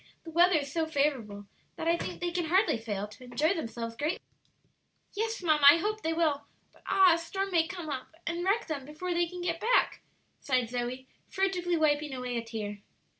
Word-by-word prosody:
"The 325 - -9
weather 350 +2 +5
is 280 -2 -4
so 325 -1 0
favorable, 260 -10 -1 0.3
that 325 - -4
I 335 - +4
think - - -5
they 350 0 -1
can 350 -1 -1
hardly 375 - +3
fail 210 -2 -3
to 210 +4 -14
enjoy 290 +8 +1
themselves 230 -8 -5
greatly." 300 +8 -1 1.0
"Yes, 445 -1 -2
mamma, 310 -3 +3
I 295 - +8
hope 430 +5 -2
they 325 - -1
will; 320 -4 0 0.3
but - - -23
ah, 375 -3 +6
a 335 - 0
storm 385 +4 -3
may 330 -2 +3
come 350 -3 -6 0.4
and 340 +1 -2
wreck 400 +5 +1
them 300 -4 -4
before 310 +6 -4
they 345 0 +1
can 360 +1 -7
get 335 -1 -1
back," 470 +6 +2 0.4
sighed 255 -4 0
Zoe, 250 +1 -3 0.2
furtively 365 -3 0
wiping 295 -2 +1
away 250 -1 -4
a 235 - -1
tear. 215 -3 -5
320 Hz, 195 wpm, -30 LUFS, 255-355 Hz, 1.0 s, I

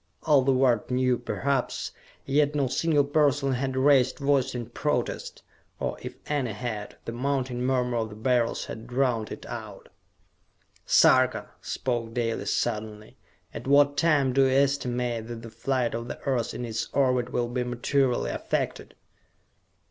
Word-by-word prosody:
All 150 -3 +5
the 135 +1 +2
world 130 -4 +2
knew, 125 0 +2
perhaps, 140 -2 -2 0.3
yet 145 +1 +2
no 140 -2 +2
single 145 +3 +2
person 145 -1 +2
had 130 +1 -2
raised 130 -2 +4
voice 140 -2 +1
in 120 -2 -5
protest - - -2 0.4
or - - -2
if - - -7
any 135 -7 -1
had, 105 -1 -5
the - - -4
mounting 130 0 -2
murmur 125 -1 +1
of 110 -1 -1
the 105 - -10
Beryls 120 +1 0
had 110 +2 -8
drowned 120 -4 0
it - - -8
out. - - -8 1.0
"Sarka!" - - +4
spoke 120 -3 -3
Dalis 115 -2 -1
suddenly. 105 -2 -3 0.4
"At - - -7
what 145 +1 +5
time 145 -4 +3
do 135 - +4
you - - +3
estimate 125 -4 0
that 115 -1 -7
the 115 - -9
flight 125 +1 -1
of 115 +1 -4
the - - -6
Earth 130 -5 -1
in 125 - -4
its 115 0 -3
orbit 125 -3 +2
will 120 -1 0
be 125 +1 -2
materially 125 +1 0
affected?" - - -3
125 Hz, 155 wpm, -27 LUFS, 120-140 Hz, 1.0 s, All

